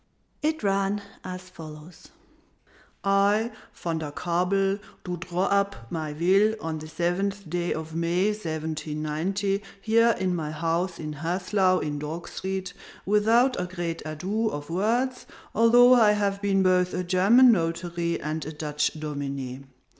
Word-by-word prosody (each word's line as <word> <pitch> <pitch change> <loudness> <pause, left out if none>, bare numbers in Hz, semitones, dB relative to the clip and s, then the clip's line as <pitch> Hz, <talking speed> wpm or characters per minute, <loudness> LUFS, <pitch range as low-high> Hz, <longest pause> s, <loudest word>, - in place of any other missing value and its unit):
It 310 -2 -1
ran 200 +1 +1 0.2
as 185 0 -7
follows: 160 -1 -12 1.0
"I, 200 +3 +3 0.2
Van 165 -2 -3
der 155 -2 -4
Kabel, 190 +5 0 0.2
do 180 -1 -3
draw 175 +2 -2
up 200 -12 0
my 155 -2 -3
will 195 +7 +3
on 160 -3 -4
this 155 +1 -10
seventh 190 +4 -1
day 175 +2 -2
of 160 0 -4
May 170 +5 +1
179, 155 -2 -3 0.4
here 230 +2 +3
in 185 -1 0
my 155 -3 -3
house 165 +3 -1
in 155 -1 -5
Haslau, 185 +3 +1
in 150 -1 -3
Dog 155 +3 -5
Street, 190 -1 -4 0.3
without 225 +4 +3
a - - -1
great 175 -2 -4
ado 185 +9 -2
of 145 -1 -6
words, 240 +8 0 0.3
although 240 +3 +6
I 220 -4 +6
have 200 -1 0
been 195 -1 +2
both 180 -1 +2
a 180 - -1
German 200 +8 +6
notary 170 -2 -1
and 155 +1 -3
a 155 - -6
Dutch 150 -1 -1
dominé. 140 -3 -5
180 Hz, 140 wpm, -26 LUFS, 160-200 Hz, 1.0 s, although